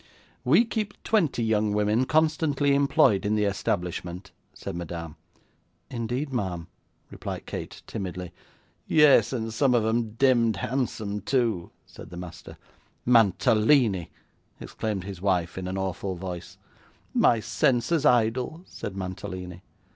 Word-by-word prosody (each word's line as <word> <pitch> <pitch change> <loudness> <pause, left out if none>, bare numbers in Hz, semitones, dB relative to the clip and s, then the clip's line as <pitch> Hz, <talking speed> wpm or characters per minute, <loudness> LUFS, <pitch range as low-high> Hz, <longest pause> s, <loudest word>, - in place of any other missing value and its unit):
'We 235 - +5
keep 215 -3 -4
twenty 165 - +1
young 110 -2 +1
women 105 +4 +2
constantly 155 -2 +2
employed 140 -7 +4
in 105 +1 +1
the 105 - +1
establishment,' 90 -1 -2 0.2
said 95 - -7
Madame. 85 -2 -6 0.8
'Indeed, 125 +4 -3
ma'am!' 95 -8 -2 0.5
replied - - -6
Kate, - - -7
timidly. 90 -2 -5 0.6
'Yes; 150 -3 +5
and 115 -3 -3
some 125 +1 +3
of 115 -2 +2
'em 110 -1 0
demd 120 -3 +3
handsome, 110 -3 -2
too,' 115 -6 0 0.2
said - - -12
the 85 - -9
master. 85 -1 -9 0.5
'Mantalini!' 110 - +4 0.5
exclaimed 105 -4 -4
his 95 -2 -8
wife, 90 -3 0
in 95 0 -4
an 95 +1 -3
awful 95 0 -3
voice. 90 -1 -7 0.6
'My 115 - +4
senses' 130 +7 +1
idol!' 125 +5 +2
said 100 - -7
Mantalini. 90 -1 -6
110 Hz, 125 wpm, -26 LUFS, 95-130 Hz, 0.8 s, We